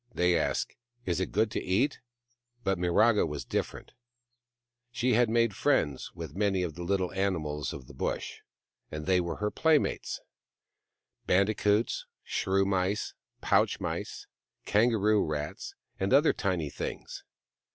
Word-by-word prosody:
They 90 -4 +2
ask, - - 0 0.2
" 120 0 -41
Is 90 -1 0
it 95 - -2
good 110 +1 +2
to - - -2
eat? 120 +11 +1 0.3
" 120 0 -43
But 95 -3 0
Miraga 105 +5 +4
was 75 -1 -5
different. - - -3 1.0
She 125 +1 +1
had 120 0 +4
made 115 -3 +2
friends 80 - +1
with - - -7
many 95 -2 +1
of 85 -3 -3
the 85 - -8
little 95 0 0
animals 85 -7 -1
of 70 -2 -8
the 70 - -13
Bush, 65 - -3 0.5
and 75 0 -6
they 90 -1 +3
were 85 -1 -3
her 105 0 -2
playmates: 160 -2 +1 1.1
bandicoots, 105 +3 +2 0.2
shrew 95 +1 +1
mice, 95 +1 0 0.3
pouch - - +2
mice, - - -4 0.4
kangaroo 105 -1 +3
rats, 75 -1 -4 0.2
and 95 - 0
other 150 +3 +5
tiny 85 -7 -1
things. - - -6
95 Hz, 140 wpm, -29 LUFS, 90-110 Hz, 1.1 s, other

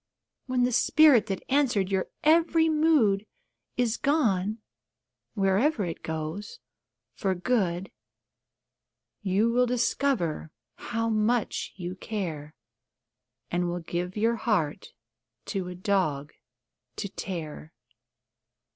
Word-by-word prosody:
When 255 -1 +1
the 250 - +2
spirit 270 0 +5
that 195 -2 -3
answered 240 -9 +2
your 190 -1 0 0.2
every 325 +1 +4
mood 295 -11 +3 0.5
Is 240 -2 +1
gone 220 - +1 0.8
wherever 205 +5 +2
it 165 -2 -5
goes 160 +6 -5 0.6
for 190 -1 -1
good, 185 -3 0 1.3
You 205 +3 +2
will 250 +1 +3
discover 235 - 0 0.2
how 230 -1 -3
much 220 +1 0
you 180 -1 -5
care, 170 -7 -5 1.0
And 175 0 0
will 175 0 -3
give 175 +3 -4
your 230 +2 +2
heart 200 -11 -1 0.6
for 195 - -2
the 180 0 -6
dog 180 -7 0 0.6
to - - -3
tear. 160 -5 -6
205 Hz, 100 wpm, -27 LUFS, 180-245 Hz, 1.3 s, spirit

